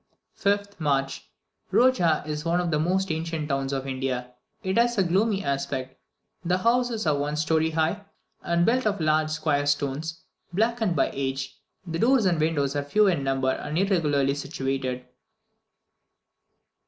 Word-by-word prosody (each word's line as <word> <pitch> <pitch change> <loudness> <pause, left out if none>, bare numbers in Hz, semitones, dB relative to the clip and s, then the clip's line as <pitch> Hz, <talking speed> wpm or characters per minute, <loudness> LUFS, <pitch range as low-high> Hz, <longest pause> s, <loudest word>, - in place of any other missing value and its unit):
5th 200 0 -1
March. 135 -3 -1 0.4
Roja 180 -13 +3
is 150 0 -4
one 170 +2 +1
of 175 -1 -1
the 150 - +1
most 185 +3 0
ancient 160 -1 -3
towns 135 0 -1
of 135 -1 -2
India. 130 -2 -3 0.3
It 190 0 -1
has 240 0 +2
a 195 - +4
gloomy 195 +3 +1
aspect; 135 -2 -3 0.5
the 180 +1 +1
houses 235 +1 +1
are 155 -2 +3
one 145 +1 -2
story 155 +1 +1
high, 160 +6 -1 0.4
and 170 0 +1
built 250 0 +2
of 205 -2 0
large 155 0 +2
square 150 -2 0
stones, 145 +4 -2 0.3
blackened 220 -1 +1
by - - +2
age; 135 0 -3 0.3
the 165 -2 -4
doors 245 0 +4
and 175 -4 +2
windows 145 -3 0
are 145 - +1
few 210 +10 +3
in 175 -8 +2
number 135 -1 +1
and 150 +4 -4
irregularly 150 -8 +2
situated. 135 -2 -3
155 Hz, 155 wpm, -26 LUFS, 140-190 Hz, 0.5 s, a